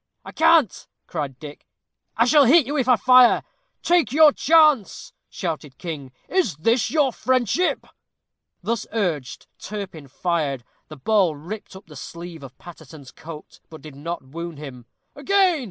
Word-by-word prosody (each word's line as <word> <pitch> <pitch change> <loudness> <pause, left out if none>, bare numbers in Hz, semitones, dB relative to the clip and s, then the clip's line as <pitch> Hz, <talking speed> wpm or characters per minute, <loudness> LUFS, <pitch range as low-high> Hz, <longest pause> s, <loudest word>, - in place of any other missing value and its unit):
"I - - -9
can't," 315 - +2 0.2
cried 145 -6 -5
Dick; 150 0 -12 0.5
"I - - +4
shall 295 -2 +5
hit 295 +3 +5
you, 285 +4 -4
if 265 -4 0
I 250 - +7
fire." 250 +2 +5 0.4
"Take 345 -5 +2
your 305 +1 +6
chance," 310 - +2 0.2
shouted 155 -6 -6
King. 150 -7 -7 0.2
"Is 365 - 0
this 225 - +1
your 290 -5 +1
friendship?" 255 - 0 0.8
Thus 230 -2 -3
urged, 170 - -3
Turpin 190 -8 -8
fired. 145 -3 -2 0.2
The 155 - -11
ball 190 +1 +1
ripped 190 +7 -9
up 190 - -13
the 155 - -15
sleeve 170 +3 -9
of 130 -2 -12
Paterson's 160 -5 -13
coat, 155 -1 -12
but 160 - -13
did 155 -2 -11
not 165 +3 -6
wound 165 +4 -8
him. 130 -5 -10 0.3
"Again!" 370 +2 +2
180 Hz, 150 wpm, -22 LUFS, -, 0.8 s, I